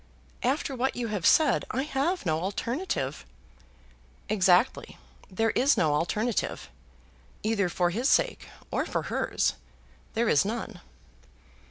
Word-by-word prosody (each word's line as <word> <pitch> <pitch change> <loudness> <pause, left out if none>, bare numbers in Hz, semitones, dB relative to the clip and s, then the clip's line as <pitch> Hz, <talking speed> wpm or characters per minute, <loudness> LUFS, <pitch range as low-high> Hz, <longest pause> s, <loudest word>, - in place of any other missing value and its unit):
"After 270 +1 0
what 260 +2 -1
you 235 -2 -3
have 205 -5 0
said, 305 -5 +4
I 265 - -1
have 300 - -1
no 160 -2 +1
alternative." 205 - -3 1.1
"Exactly. 195 +2 +2 0.3
There 225 +4 0
is 275 +4 +3
no 155 -3 +2
alternative. 210 +9 -1 0.7
Either 215 -4 +1
for 175 0 +1
his 240 +9 0
sake - - +1 0.2
or - - -1
for - - -2
hers, - - 0 0.6
there 230 +1 +1
is 145 - +4
none." 215 -3 -5
225 Hz, 125 wpm, -27 LUFS, 180-260 Hz, 1.1 s, said